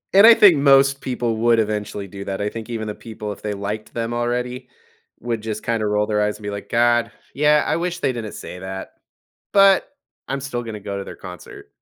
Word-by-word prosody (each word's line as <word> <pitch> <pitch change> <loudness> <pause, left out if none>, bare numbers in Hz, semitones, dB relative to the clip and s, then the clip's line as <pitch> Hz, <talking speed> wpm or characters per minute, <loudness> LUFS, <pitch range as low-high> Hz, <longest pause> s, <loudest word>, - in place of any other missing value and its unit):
And 200 +3 +9
I 230 - +10
think 185 -8 +7
most 135 -1 +4
people 120 -3 -2
would 115 0 +3
eventually 105 -2 -2
do 100 +1 -8
that. 95 -1 -4
I 100 - -1
think 115 +2 -6
even 110 -2 -4
the 105 - -3
people, 110 -2 -7
if - - -16
they 105 -1 -3
liked 105 +3 -5
them 115 0 -2
already, 125 +1 -2 0.5
would 115 -1 -3
just 110 -1 -5
kinda 115 -2 0
roll 105 0 +1
their 105 -1 0
eyes 105 0 0
and 105 - -16
be 105 - -3
like, 100 0 -7
"God. 120 0 +2 0.2
Yeah, 150 +1 +4
I - - 0
wish 175 +1 -2
they 135 -7 0
didn't 115 -3 -6
say 90 - -8
that, 95 0 -6 0.6
but, 195 -1 +5 0.4
I'm 135 +1 -2
still 125 -3 -3
gonna 110 -3 -7
go 100 0 -5
to 100 - -5
their - - -9
concert." 90 -1 -11
115 Hz, 225 wpm, -21 LUFS, 105-125 Hz, 0.6 s, I